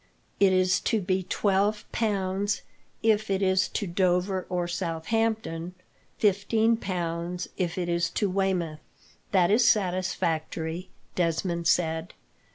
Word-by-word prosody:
It 195 -1 +5
is 185 0 +3
to 225 - 0
be 185 0 0
twelve 200 +3 +1
pounds 200 -2 -1 0.4
if 220 -1 +2
it 195 0 +1
is 190 -1 +3
to 205 - -3
Dover 185 +1 0
or 180 -1 -1
Southampton; 175 +1 -2 0.4
fifteen 220 +3 +2
pounds 175 -3 -3
if 175 -2 -2
it 180 -1 -1
is 170 -1 +1
to 205 - 0
Weymouth." 185 -5 -1 0.5
"That 185 -2 +4
is 230 +3 +5
satisfactory," 175 -4 0 0.2
Desmond 170 0 0
said. 160 0 +1
185 Hz, 120 wpm, -27 LUFS, 170-200 Hz, 0.5 s, It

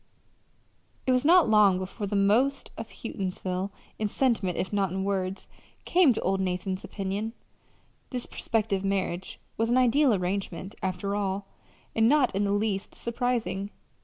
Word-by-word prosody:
It 260 - +2
was 255 0 +3
not 345 +4 +6
long 210 -4 +5
before 190 +3 -4
the 205 - -2
most 230 +8 +2
of 225 - -7
Houghtonsville 190 -3 -3 0.3
in 215 - +1
sentiment, 215 -6 0
if 190 - -2
not 200 -2 +2
in 190 +2 -2
words 195 -1 -2 0.4
came 350 -6 +5
to - - -3
old 190 +1 +1
Nathan's 185 0 -2
opinion: 200 +3 -3 0.8
this 250 -2 -4
prospective 210 -4 -1
marriage 190 -2 -2 0.2
was 225 +1 +1
an 245 - +3
ideal 255 +2 +4
arrangement, 190 0 -2
after 190 +2 -2
all, 200 -1 -1 0.5
and 225 +1 +4
not 280 -4 +4
in 200 +1 +1
the 200 - 0
least 205 -1 -1
surprising. 235 -4 -2
200 Hz, 150 wpm, -27 LUFS, 190-230 Hz, 0.8 s, not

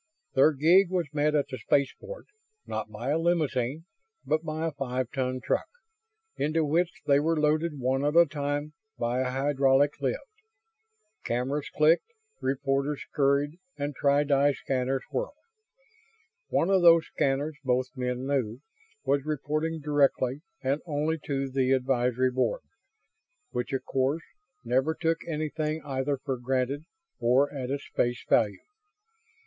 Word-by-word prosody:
Their 135 +4 +6
gig 170 +7 +5
was 175 -5 -2
met 150 +1 +2
at 145 -2 +2
the 130 - -6
spaceport; 145 - -1 0.4
not 110 0 -4
by 115 +5 -5
a 160 - +2
limousine, 155 -4 0 0.4
but 155 +1 +1
by 155 0 -3
a 165 - -1
five 130 -3 -3
ton 130 -1 -1
truck, - - 0 0.7
into 155 +1 +1
which 170 +4 +1
they 140 -1 +5
were 160 +2 +1
loaded 155 +1 +1
one 130 +2 0
at 145 +2 +1
a 170 0 +8
time 145 0 -3 0.2
by 120 +1 -1
a 130 -1 0
hydraulic 135 +1 +2
lift. - - -1 1.0
Cameras 130 +5 -2
clicked, 165 - +3 0.3
reporters 135 +2 0
scurried, 145 +3 +1 0.2
and 145 0 -3
tri 140 +2 +3
di 145 0 +3
scanners 130 0 -1
whirred. - - -3 1.1
One 175 - +1
of 190 -1 +4
those 165 -1 +7
scanners, 145 +1 -1
both 130 +1 0
men 125 0 -2
knew, 130 -5 -1 0.5
was 140 0 +2
reporting 155 +2 -2
directly 140 -2 +1 0.2
and 140 +3 0
only 155 +1 -1
to 135 -1 -1
the 130 0 +1
Advisory 125 -1 +1
Board 130 - 0 0.9
which, 125 0 -3
of 135 - -2
course, 135 +5 0 0.4
never 130 +6 +1
took 165 -1 0
anything 155 0 -2
either 135 0 -1
for 130 0 -3
granted 130 +4 -1 0.3
or 130 +5 +3
at 130 -3 -4
its 140 +1 -3
face 120 +1 0
value. 105 -3 +3
140 Hz, 140 wpm, -28 LUFS, 130-155 Hz, 1.1 s, a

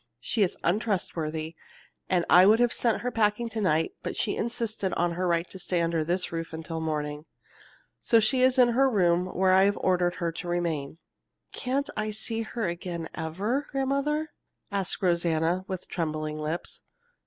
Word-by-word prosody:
She 210 - -1
is 190 - +2
untrustworthy, 165 -5 -1 0.5
and 180 -2 +2
I 180 +2 +7
would 220 +2 +6
have 240 -1 +3
sent 230 -3 +1
her 250 - -2
packing 225 +1 +1
to 220 -1 -3
night, 165 -4 +2
but - - -4
she 205 - 0
insisted 225 -4 -2
on 175 0 +1
her 180 +2 -1
right 170 0 +1
to 190 - -8
stay 180 -1 -1
under 165 -1 +1
this 180 +3 -1
roof 165 -1 -4
until 160 0 -5
morning. 150 -1 -3 0.7
So 230 - +4
she 255 +4 +2
is 260 +1 +4
in 250 -1 +6
her 265 +3 +3
room 180 -5 +2
where 185 0 +2
I 190 +1 +6
have 200 +1 +1
ordered 180 -1 +1
her 170 -1 -2
to 165 - -7
remain." 165 -4 -2 0.5
"Can't 275 +2 -2
I 215 0 -1
see 225 +1 -2
her 225 -1 -3
again 170 -1 -4
ever, 200 - -2
grandmother?" 280 +3 -1 0.4
asked 200 0 -2
Rosanna, 170 0 +1
with 185 -2 -5
trembling 155 -2 -3
lips. 155 +3 -4
185 Hz, 175 wpm, -27 LUFS, 165-225 Hz, 0.7 s, I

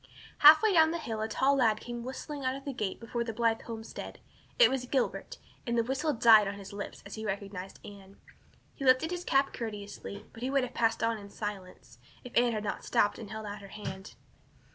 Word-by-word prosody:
Halfway 315 +8 +8
down 320 -2 +6
the 335 - -2
hill 225 -9 -4
a 220 - -1
tall 270 +5 +2
lad 220 -4 +3
came 240 0 -6
whistling 275 +3 -6
out 260 0 0
of 275 - -9
a 280 - -3
gate 210 -6 -3
before 235 +1 -3
the 225 -1 -5
Blythe 230 0 +1
homestead. 225 -1 -8 0.4
It - - +7
was 255 -2 -2
Gilbert, 260 -1 -1 0.3
and 235 0 0
the 230 - +3
whistle 265 +5 -1
died 225 -5 +6
on 200 - -3
his 200 0 -10
lips 200 0 -7
as 200 - -9
he 220 - -6
recognized 195 -2 -5
Anne. 200 -1 -12 0.6
He - - -8
lifted 260 +5 +4
his 355 0 -3
cap 275 -3 +2
courteously, 205 -2 -7
but 225 - -12
he 255 - -1
would 275 -1 +2
have 250 0 -5
passed 225 -2 +1
on 230 -1 +1
in 200 0 -11
silence, 200 -3 -7 0.2
if 250 - -11
Anne 240 0 +4
had 215 -1 -3
not 205 - -4
stopped 205 - +1
and 220 -3 -8
held 220 +1 -6
out 205 0 -6
her 200 - -10
hand. 195 -1 -8
230 Hz, 220 wpm, -30 LUFS, 205-260 Hz, 0.6 s, Halfway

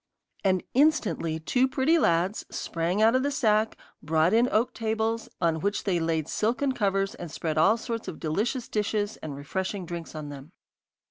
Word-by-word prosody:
And 185 -2 +2
instantly 215 - +2
two 250 +11 +2
pretty 270 +6 +2
lads 175 - +1
sprang 175 +5 -1
out 225 +2 +5
of 260 - +3
the 285 - 0
sack, 220 -6 +1 0.2
brought 160 +4 +2
in 235 +3 +4
oak 225 +3 +2
tables, 225 0 -1
on 165 -2 +1
which 200 +4 -1
they 185 -4 +1
laid 165 -2 0
silken 250 +6 0
covers, 195 -5 0
and 175 - -8
spread 155 0 -2
all 205 +8 +5
sorts 230 0 -5
of 160 - -6
delicious 220 - -1
dishes 210 0 -1
and 150 -3 -7
refreshing 190 +7 -3
drinks 170 -1 -7
on 150 -1 -6
them. 145 +4 -10
200 Hz, 175 wpm, -27 LUFS, 165-230 Hz, 0.2 s, out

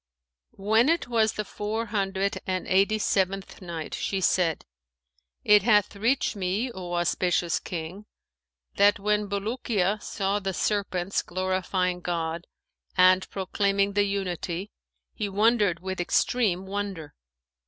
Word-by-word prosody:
When 220 +7 +3
it 335 -3 +1
was 225 -2 +2
the 210 - -3
Four 215 +3 -3
Hundred 195 -2 -1
and 185 -1 -1
Eighty 200 +3 +3
seventh 195 -2 -1
Night, 170 -3 -6
She 195 - -2
said, 175 -3 +1 0.8
It 210 0 +6
hath 210 -1 +3
reached 230 +4 +1
me, 200 +6 -1
O 180 -4 -7
auspicious 175 0 +1
King, 180 +5 -7 0.7
that 205 +2 +5
"when 210 0 0
Bulukiya 205 -1 -1
saw 200 +1 -1
the 195 -2 -3
serpents 195 -2 -1
glorifying 185 0 -1
God 170 -1 -3 0.5
and 185 0 +5
proclaiming 200 +1 0
the 205 0 +3
Unity, 190 -1 -3 0.4
he 210 -2 -3
wondered 205 -4 +2
with 190 -1 -3
extreme 190 0 +1
wonder. 195 -5 -5
195 Hz, 120 wpm, -26 LUFS, 185-210 Hz, 0.8 s, It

